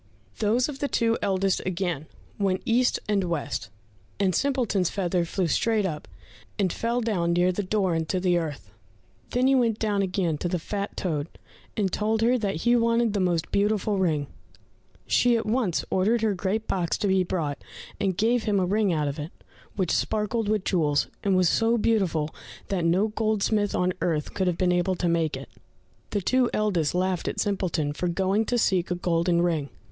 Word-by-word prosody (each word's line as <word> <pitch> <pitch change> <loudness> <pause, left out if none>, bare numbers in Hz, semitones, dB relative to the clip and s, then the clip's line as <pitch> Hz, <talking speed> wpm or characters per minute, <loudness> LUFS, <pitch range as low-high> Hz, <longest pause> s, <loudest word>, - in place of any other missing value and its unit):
Those 225 +4 +2
of 285 -3 -7
the 285 - 0
two 230 -4 +1
eldest 195 -1 +1
again 175 -5 -2 0.3
went 190 -2 0
east 245 +2 +2
and 205 -2 +1
west, 145 - -3 0.5
and 190 -2 +2
Simpleton's 235 - +1
feather 180 -3 0
flew 185 +2 -1
straight 215 +6 +1
up, 155 -5 -4 0.5
and 185 -4 +1
fell 235 +2 -1
down 180 -7 0
near 175 +1 +3
the 185 - -2
door 195 -2 0
into 165 +3 -1
the 180 -1 +2
earth. 145 - -6 0.6
Then 250 +1 +1
he 270 - +4
went 235 -5 +2
down 210 -3 0
again 180 -5 -1
to - - -1
the 180 - 0
fat 200 +4 -4
toad, 155 -5 -2 0.5
and 195 -4 0
told 220 +1 0
her 240 +2 +4
that 195 -7 -2
he 240 0 +5
wanted 230 -1 +2
the 205 - 0
most 175 -3 0
beautiful 205 0 +1
ring. 155 -6 +1 0.8
She 240 -1 +3
at 225 - -3
once 215 -6 0
ordered 215 +5 +2
her 215 -2 +2
great 200 +4 -2
box 175 -3 0
to 205 - -1
be 190 -1 +3
brought, 160 -6 -3 0.4
and 190 -3 0
gave 230 +2 +2
him 205 -2 +2
a 185 - +2
ring 205 +1 +1
out 150 -3 0
of 140 +2 -4
it, 150 +2 -5 0.5
which 185 -4 0
sparkled 215 0 0
with 210 -3 0
jewels, 150 -6 +1
and 195 -2 +2
was 185 -1 +4
so 225 +6 +2
beautiful 190 -9 +1 0.4
that 185 -4 0
no 185 +6 +2
goldsmith 215 -1 0
on 180 0 +1
earth 155 -3 -1
would 190 - +2
have 175 -2 0
been 180 -1 +2
able 180 +1 +1
to 175 - -1
make 165 -2 +1
it. - - -9 0.6
The 205 - -1
two 255 +5 +2
eldest 180 -8 0
laughed 185 -1 0
at - - -3
Simpleton 175 -7 -1
for 180 - -2
going 190 +5 +1
to 245 - 0
seek 190 -6 +1
a 180 - 0
golden 170 0 +1
ring. 160 -5 0
190 Hz, 190 wpm, -26 LUFS, 175-215 Hz, 0.8 s, he